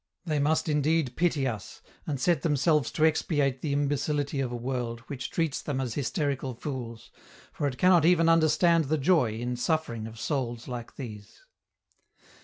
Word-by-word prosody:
They 155 Hz, -4 st, 0 dB
must 155 Hz, +4 st, +1 dB
indeed 150 Hz, -3 st, +1 dB
pity 160 Hz, -5 st, +1 dB
us, 110 Hz, -6 st, -5 dB, 0.2 s
and 140 Hz, -3 st, -2 dB
set 170 Hz, +5 st, +2 dB
themselves 150 Hz, -3 st, +2 dB
to 155 Hz, -, +3 dB
expiate 145 Hz, -4 st, +1 dB
the 150 Hz, -, -2 dB
imbecility 145 Hz, 0 st, 0 dB
of 130 Hz, -3 st, -1 dB
a -, -, -3 dB
world 120 Hz, -1 st, -3 dB
which 130 Hz, +3 st, -6 dB
treats 165 Hz, -5 st, -1 dB
them 140 Hz, -3 st, -3 dB
as 125 Hz, -3 st, -2 dB
hysterical 140 Hz, -1 st, -2 dB
fools, 120 Hz, -4 st, -6 dB, 0.4 s
for 145 Hz, -, -1 dB
it 130 Hz, -2 st, -4 dB
cannot 180 Hz, -3 st, +5 dB
even 165 Hz, 0 st, +4 dB
understand 165 Hz, 0 st, +4 dB
the 155 Hz, +3 st, 0 dB
joy 140 Hz, -6 st, +3 dB
in 120 Hz, +2 st, -3 dB
suffering 120 Hz, -4 st, -1 dB
of 115 Hz, 0 st, -11 dB
souls 120 Hz, -2 st, -3 dB
like 120 Hz, -2 st, -7 dB
these. 105 Hz, -6 st, -9 dB
140 Hz, 165 wpm, -28 LUFS, 125-155 Hz, 0.4 s, cannot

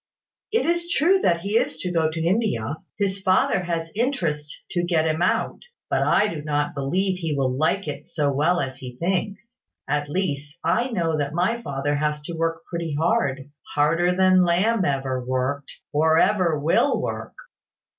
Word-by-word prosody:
"It 455 Hz, -, +1 dB
is 345 Hz, 0 st, 0 dB
true 350 Hz, +4 st, +3 dB
that 170 Hz, -, +2 dB
he 205 Hz, +5 st, +1 dB
is 230 Hz, -9 st, 0 dB
to 180 Hz, +3 st, -4 dB
go 165 Hz, -2 st, +2 dB
to 160 Hz, +1 st, -3 dB
India. 170 Hz, -, 0 dB, 0.2 s
His 195 Hz, -1 st, -1 dB
father 185 Hz, 0 st, +3 dB
has 165 Hz, -1 st, -3 dB
interest 170 Hz, -, -2 dB
to 175 Hz, -, 0 dB
get 170 Hz, -2 st, +1 dB
him 160 Hz, +1 st, 0 dB
out. 180 Hz, -, +1 dB, 0.3 s
But -, -, +2 dB
I 210 Hz, -, +3 dB
do 165 Hz, -7 st, -4 dB
not 145 Hz, -1 st, -1 dB
believe 180 Hz, +7 st, -1 dB
he 160 Hz, -4 st, -2 dB
will 130 Hz, -2 st, 0 dB
like 160 Hz, +6 st, 0 dB
it 145 Hz, 0 st, -6 dB
so 145 Hz, -3 st, 0 dB
well 165 Hz, +6 st, +2 dB
as 135 Hz, -3 st, -3 dB
he 125 Hz, -2 st, -9 dB
thinks. 195 Hz, -, -3 dB, 0.3 s
At 145 Hz, +1 st, -1 dB
least, 150 Hz, -3 st, -3 dB
I 240 Hz, +3 st, +1 dB
know 165 Hz, -8 st, 0 dB
that 145 Hz, +1 st, -2 dB
my 230 Hz, +7 st, +1 dB
father 145 Hz, -5 st, -2 dB
has 150 Hz, 0 st, -1 dB
to 170 Hz, -, -6 dB
work 165 Hz, 0 st, -2 dB
pretty 170 Hz, -3 st, -3 dB
hard, 145 Hz, -, 0 dB, 0.2 s
harder 165 Hz, +5 st, +3 dB
than 185 Hz, 0 st, +5 dB
Lamb 185 Hz, +4 st, +2 dB
ever 135 Hz, -3 st, -1 dB
worked, 130 Hz, +3 st, -2 dB, 0.2 s
or 160 Hz, +2 st, +3 dB
ever 185 Hz, -4 st, +3 dB
will 165 Hz, -, +2 dB
work." -, -, -4 dB
165 Hz, 175 wpm, -23 LUFS, 145-190 Hz, 0.3 s, than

